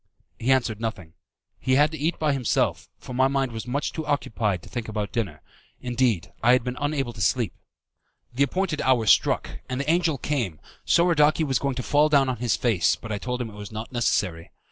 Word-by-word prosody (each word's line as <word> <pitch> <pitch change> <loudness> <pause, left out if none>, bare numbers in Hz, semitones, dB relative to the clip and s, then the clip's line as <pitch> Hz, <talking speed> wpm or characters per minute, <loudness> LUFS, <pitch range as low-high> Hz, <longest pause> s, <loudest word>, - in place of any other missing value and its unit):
He 125 +3 +1
answered 120 -5 +1
nothing. 95 -8 -5 0.5
He 130 +1 +1
had 150 +3 +4
to 160 - -5
eat 160 +4 0
by 150 -2 +1
himself, 130 -5 0
for 125 - -9
my 130 +1 +3
mind 135 -2 0
was 110 -1 -6
too - - -9
much 140 +4 -2
occupied 110 - -1
to - - -12
think 120 -2 -5
about 105 -2 -3
dinner 105 - -3 0.4
indeed, 120 -7 0
I 120 +2 +5
had 125 - +3
been 125 +1 -3
unable 140 -4 -1
to 110 - -8
sleep. 110 0 +1 0.8
The 130 - -2
appointed 155 +3 0
hour 125 -4 +3
struck 100 - +2
and 130 0 -2
the 140 - -3
angel 165 -2 +2
came, 120 - -2 0.3
Soradaci 160 -2 +4
was 135 -4 +1
going 140 -2 -1
to 125 - -3
fall 150 +4 +3
down 140 -3 +4
on 125 - -2
his 120 0 0
face, 95 -11 +2
but 115 - -9
I 105 - -2
told 125 +1 -3
him 115 - -7
it - - -14
was 105 0 -9
not 110 +3 -6
necessary. 100 -8 0
125 Hz, 210 wpm, -25 LUFS, 110-140 Hz, 0.8 s, I